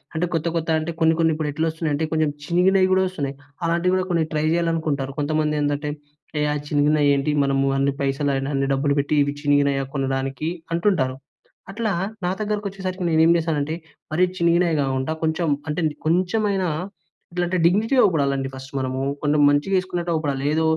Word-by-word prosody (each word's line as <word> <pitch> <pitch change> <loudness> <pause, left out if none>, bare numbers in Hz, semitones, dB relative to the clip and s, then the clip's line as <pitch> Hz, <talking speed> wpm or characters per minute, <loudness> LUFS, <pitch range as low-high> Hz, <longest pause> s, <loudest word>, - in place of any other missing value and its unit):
అంటే 165 +3 +1
కొత్త, 165 +1 0
కొత్త 165 0 -2
అంటే 165 +1 -4
కొన్ని, 160 0 +5
కొన్ని 165 -1 +3
ఇప్పుడు 155 -1 -2
ఎట్లా 160 +3 -1
వస్తున్నాయి 160 -2 -2
అంటే 160 +1 -1
కొంచెం 155 -1 +2 0.2
చినిగినవి 185 +3 +3
కూడా 190 - +3
వస్తున్నాయి. 140 -7 -4 0.3
అలాంటివి 170 +2 +1
కూడా 185 0 0
కొన్ని 165 -2 +2
ట్రై 155 0 0
చేయాలనుకుంటారు. 160 -5 -1
కొంతమంది 150 0 0
ఏందంటే, 145 +1 -1 0.5
ఏ 150 - +1 0.3
చినిగినవి 145 0 +3
ఏంటి? 140 +2 0
మనము 135 0 +1 0.4
పైసలు 140 +1 0
అయినా 135 +1 -2
అన్ని 135 0 0
డబ్బులు 140 +1 +1
పెట్టి 145 +2 -1
ఇవి 145 0 -3
చినిగినయా 140 -1 +2
కొనడానికి 135 +3 -2 0.2
అంటుంటారు. 165 -8 +1 0.5
అట్లా 220 +1 -1 0.3
నా 180 - +1
దగ్గరకి 210 0 -2
వచ్చేసరికి 185 -1 -5
నేను 160 0 +4
ఏం 170 - +5
చేశానంటే, 155 -2 -1 0.4
మరి 180 +4 +3 0.2
చినిగినయే 170 0 +3
కాకుండా 135 +3 -1
కొంచెం 160 0 0 0.2
అంటే 150 +4 -1 0.3
కొంచెమైనా 185 +1 +1 0.6
ఇట్లా 175 0 0
అంటే 185 +1 0
డిగ్నిటీ‌గా 220 +9 +3
అగుపడాలండి 140 -7 +1
ఫస్టు 130 +1 -10
మనము. 130 0 -2 0.2
కొంచెం 150 0 +2
మంచిగా 145 +7 +1
వేసుకున్నట్టు 175 -2 -2
అగుపడాలి. 140 -4 -1
ఏదో, 160 +1 +1
155 Hz, 170 wpm, -22 LUFS, 140-175 Hz, 0.6 s, కొన్ని